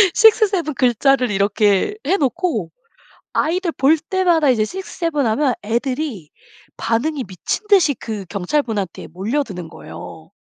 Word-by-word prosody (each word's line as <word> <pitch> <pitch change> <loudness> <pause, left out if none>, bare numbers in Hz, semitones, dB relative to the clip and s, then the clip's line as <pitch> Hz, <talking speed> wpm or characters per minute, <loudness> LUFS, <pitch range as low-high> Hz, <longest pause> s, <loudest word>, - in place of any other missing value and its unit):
6-7 420 -8 +4
글자를 250 0 +2
이렇게 205 - +2
해놓고 345 +1 0 0.6
아이들 340 +2 0
볼 285 +3 +4
때마다 335 -3 +2
이제 225 -4 +2
6-7 330 - -2
하면 255 +4 +1
애들이 235 - -2 0.5
반응이 260 +5 -1
미친 190 - -4
듯이 365 -8 +5
그 215 -5 -6
경찰분한테 205 - -2
몰려드는 195 - -3
거예요. - - -11
270 Hz, 245 characters per minute, -19 LUFS, 215-330 Hz, 0.6 s, 듯이